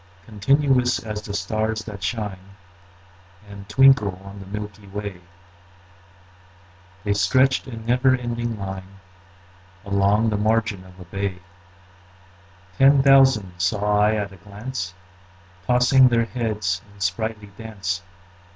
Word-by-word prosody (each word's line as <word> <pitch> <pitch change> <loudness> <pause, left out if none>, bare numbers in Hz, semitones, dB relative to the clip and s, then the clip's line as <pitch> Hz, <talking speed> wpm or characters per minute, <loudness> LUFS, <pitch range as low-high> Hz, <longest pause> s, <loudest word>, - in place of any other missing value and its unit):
Continuous 125 +4 +2
as 105 -1 -5
the 105 -1 -7
stars 110 +3 -2
that 100 -3 -9
shine 95 -1 -4 0.9
And 100 0 -11
twinkle 110 -6 +4
on 100 +1 -10
the 95 - -10
milky 105 0 -7
way, 100 -2 -6 1.8
The 105 - +1
stretched 130 +9 +2
in 115 -3 -8
never 125 +2 +3
ending 120 -2 -3
line 95 0 -7 0.9
Along 100 +3 +2
the 105 - 0
margin 110 -2 0
of 95 0 -16
a 90 - -10
bay: 95 +1 -3 1.4
Ten 135 0 +6
thousand 135 -9 +5
saw 105 +2 +1
I 105 +1 +3
at 100 -2 -3
a 95 - -13
glance, 100 0 -6 0.7
Tossing 125 +1 +5
their 115 -1 +2
heads 105 -6 -2
in 100 - -19
sprightly 105 +2 -3
dance. 95 -4 -4
105 Hz, 120 wpm, -23 LUFS, 100-120 Hz, 1.8 s, Ten